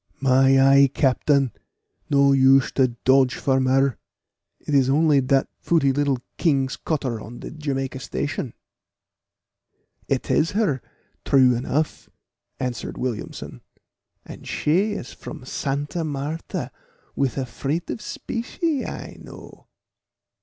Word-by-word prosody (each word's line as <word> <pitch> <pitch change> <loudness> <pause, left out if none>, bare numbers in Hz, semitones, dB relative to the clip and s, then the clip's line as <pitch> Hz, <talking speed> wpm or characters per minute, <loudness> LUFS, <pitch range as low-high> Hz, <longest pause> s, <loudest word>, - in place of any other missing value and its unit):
"My 135 0 +4
eye, 135 +1 +6
captain, 135 -1 +2 0.6
no 140 -1 +4
use 135 0 +5
to 130 -2 +3 0.2
dodge 130 -1 +4
from 130 0 +1
her; 135 -1 +2 0.6
it 150 - -5
is 135 -2 +4
only 150 0 +4
dat 135 +1 +2
footy 155 -5 +2
little 140 -1 +1 0.2
King's 135 -5 +1
cutter 135 -8 -2
on 120 +3 -9
de - - -8
Jamaica 135 -4 -3
station." 135 -2 -4 1.5
"It - - -1
is 165 +6 +2
her, 195 - +1 0.4
true 130 -2 +5
enough," 140 +6 -2 0.5
answered 125 -3 -4
Williamson; 120 - -5 0.6
"and - - -11
she 190 +8 +1
is 135 - -7
from 125 - -10
Santa 145 +5 -3
Martha 150 +2 -4 0.4
with 135 -3 -1
a 135 - -1
freight 145 +6 -3
of - - -5
specie, 275 - -3
I - - -7
know. - - -13
135 Hz, 120 wpm, -23 LUFS, 130-150 Hz, 1.5 s, eye